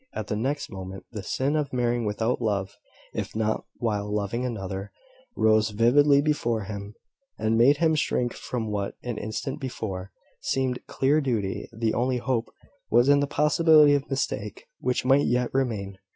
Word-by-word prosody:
At 110 - -4
the - - 0
next 135 +7 -2
moment, 95 0 -8
the 110 -3 -5
sin 135 +9 -1
of 150 -2 -1
marrying 120 -2 0
without 110 +4 -1
love, 100 -3 -1 0.4
if - - -4
not 110 0 -1
while 105 -3 -2
loving 105 +3 -1
another, 100 -5 -4 0.4
rose 110 0 +3
vividly 140 +7 +4
before 120 -8 0
him, 100 +1 -7 0.4
and 110 +1 +1
made 130 +6 +5
him 160 0 +3
shrink 125 -5 0
from 115 -4 -4
what, 100 -1 -2
an 120 -3 -4
instant 115 +7 -4
before, 100 -7 -5 0.3
seemed 130 -2 -1
clear 145 +3 +2
duty. 110 -8 -2
The 115 -1 -1
only 125 +1 +1
hope 120 -1 -1 0.4
was 120 +3 +4
in 145 0 +6
the 145 - +1
possibility 150 0 +5
of 140 -1 0
mistake, 105 -7 -3
which 125 0 -1
might 135 +2 +4
yet 125 0 0
remain. 105 -8 -2
120 Hz, 165 wpm, -26 LUFS, 105-135 Hz, 0.4 s, in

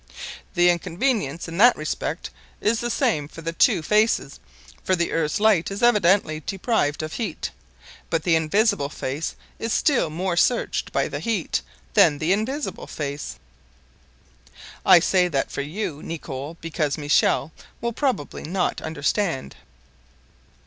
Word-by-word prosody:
"The 175 0 +5
inconvenience, 175 - -1
in 165 +2 -6
that 240 +3 +7
respect, - - -3 0.3
is 225 +2 +1
the 240 - -2
same 150 -9 +1
for 165 +2 -11
the 165 +1 -3
two 165 - +3
faces, 210 -7 +1 0.4
for 185 - +2
the 170 -1 -1
earth's 155 0 0
light 210 -6 +3
is 200 +3 -5
evidently 200 -8 +4
deprived 190 - 0
of 155 - -5
heat. 230 - -3 0.6
But 165 -2 0
the 170 -1 +3
invisible 160 -2 +2
face 145 +2 -4 0.2
is 225 - -2
still 270 - +2
more 175 +3 -2
searched 240 +7 +1
by - - +1
the - - -4
heat 225 -7 -1 0.3
than 170 -8 +5
the 160 +5 +2
visible 275 +6 -4
face. 145 -1 -5 1.5
I - - +8
say 180 +1 +3
that 140 -6 -1
for - - -3
you, 155 0 -4
Nicholl, 150 -1 -6
because 155 -3 -1
Michel 150 0 +2 0.3
will 235 0 -2
probably 250 - -2
not 180 +3 -1
understand." 160 0 -1
170 Hz, 140 wpm, -23 LUFS, 155-210 Hz, 1.5 s, I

